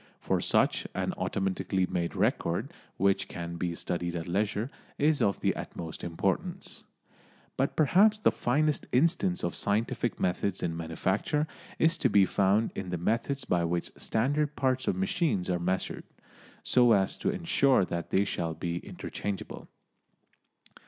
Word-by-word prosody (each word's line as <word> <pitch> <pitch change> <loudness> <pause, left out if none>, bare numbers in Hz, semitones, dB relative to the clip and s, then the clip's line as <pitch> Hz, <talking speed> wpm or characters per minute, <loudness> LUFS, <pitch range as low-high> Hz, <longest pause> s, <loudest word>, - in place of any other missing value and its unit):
For - - 0
such, - - +2
an - - -1
automatically 95 -1 -1
made 85 -2 -2
record, - - 0 0.2
which 100 +1 +2
can 85 -1 -6
be 85 -1 -2
studied 85 0 -3
at 85 0 -4
leisure, 105 +7 -1 0.3
is 150 0 +2
of 100 -2 +1
the - - +1
utmost 80 -2 -7
importance. 85 -1 -3 0.7
But 135 - 0
perhaps 195 +8 +5
the - - +4
finest 150 +4 0
instance 170 +7 +2
of - - -1
scientific 110 +3 0
methods 90 +1 -1
in 80 - -1
manufacture 95 - -1 0.3
is 160 +1 +3
to - - +3
be 100 -2 +5
found 100 +4 +2
in 95 -2 -5
the 90 - -2
methods 115 +10 -1
by 85 -1 +1
which 85 +1 -1
standard 145 +6 0
parts 130 -1 0
of - - +2
machines 175 - 0
are 90 - 0
measured, 95 +2 -2 0.6
so 120 -2 +5
as 95 -2 +2
to - - 0
ensure 165 - +3
that 85 -1 -4
they 100 +1 +2
shall 85 -4 -2
be 85 +1 -3
interchangeable. 100 +2 -6
100 Hz, 145 wpm, -29 LUFS, 90-140 Hz, 0.7 s, perhaps